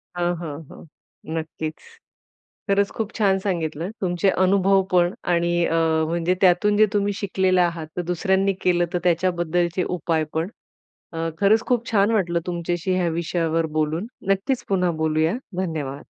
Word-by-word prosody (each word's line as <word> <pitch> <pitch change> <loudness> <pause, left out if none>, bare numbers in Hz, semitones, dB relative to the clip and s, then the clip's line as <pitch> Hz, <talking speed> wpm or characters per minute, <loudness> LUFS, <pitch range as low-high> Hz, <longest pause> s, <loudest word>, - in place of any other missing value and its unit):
हां, 175 0 0
हां, 150 -4 -5
हां, - - -12 0.5
नक्कीच. 160 -1 -4 0.9
खरंच 200 0 +3
खूप 220 -1 -2
छान 195 -3 +3
सांगितलं 170 -3 -2
तुमचे 180 0 +1
अनुभव 195 +1 +4
पण 175 0 +3 0.2
आणि 170 0 +1
अ, 165 - 0 0.3
म्हणजे 170 +2 0
त्यातून 195 +3 +4
जे 215 - +7
तुम्ही 205 0 +1
शिकलेले 185 -2 +2
आहात. 170 -2 -1
तर - - +1
दुसऱ्यांनी 190 +3 +1
केलं 175 -1 +2
तर 180 - +1
त्याच्याबद्दलचे 175 0 +1
उपाय 160 -1 0
पण. 160 +3 -1 0.6
अ, 165 0 -2
खरंच 210 +4 +3
खूप 240 -1 0
छान 205 0 +3
वाटलं 175 -6 +1
तुमच्याशी 175 +1 -2
ह्या 180 -2 +1
विषयावर 165 -1 0
बोलून. 160 +7 -1 0.2
नक्कीच 195 +7 0
पुन्हा 180 -3 +2
बोलूया. 155 +2 +2 0.3
धन्यवाद. 150 -6 -4
175 Hz, 145 wpm, -23 LUFS, 165-195 Hz, 0.9 s, जे